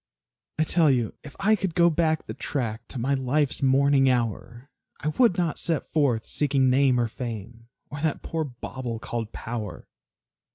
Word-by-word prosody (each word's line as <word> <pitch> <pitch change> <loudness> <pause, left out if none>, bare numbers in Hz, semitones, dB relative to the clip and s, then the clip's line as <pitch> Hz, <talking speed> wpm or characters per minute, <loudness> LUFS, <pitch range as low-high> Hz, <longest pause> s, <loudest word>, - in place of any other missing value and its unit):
I 155 - +3
tell 160 -1 +3
you, 120 -5 +1
if 140 - -11
I 215 +2 +4
could 190 -5 -3
go 170 -1 +5
back 160 -1 +1
the - - -6
track 115 -4 -3
To - - -8
my 130 +4 0
life's 135 +2 0
morning 135 0 +4
hour, 120 +2 -2 0.3
I 150 - -1
would 210 +2 +3
not 170 -4 0
set 165 -5 -2
forth 135 -7 +2
seeking 135 -3 +2
name 130 -1 +4
or 120 - +2
fame, 115 -1 -7 0.2
Or 145 - -5
that 155 -2 -1
poor 160 -1 -2
bauble 125 -3 -6
called 115 -1 -4
power. 110 -4 -6
135 Hz, 170 wpm, -26 LUFS, 120-155 Hz, 0.3 s, go